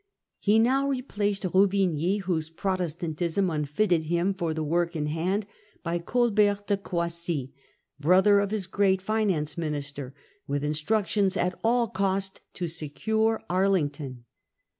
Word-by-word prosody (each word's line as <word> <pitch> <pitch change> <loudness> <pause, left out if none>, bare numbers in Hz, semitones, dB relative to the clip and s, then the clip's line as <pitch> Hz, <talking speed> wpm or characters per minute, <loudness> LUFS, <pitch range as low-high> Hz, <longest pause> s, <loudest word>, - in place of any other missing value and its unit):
He 210 +2 +3
now 265 +5 +3
replaced 210 -7 -1
Ruvigny, 190 -1 +2
whose 165 -4 -2
Pro 185 +4 -1
testantism 170 +1 -1
unfitted 160 +3 +1
him 170 +4 +1
for 175 -4 -2
the 160 0 -2
work 170 +3 0
in 150 -2 -1
hand, 180 +7 -1 0.4
by 170 0 -1
Colbert 205 0 +2
de 205 - +2
Croissy, 170 -7 -3 0.5
brother 190 +6 +5
of 200 -1 0
his 210 -2 -2
great 190 0 +2
finance 190 -7 -1
minister, 145 -4 -4 0.3
with 140 0 -1
instructions 190 +6 +1
at 180 +1 +1
all 235 +1 +3
cost 195 -1 -1
to 175 - -2
secure 220 +8 -1
Arlington. 150 -9 0
185 Hz, 130 wpm, -27 LUFS, 160-200 Hz, 0.5 s, brother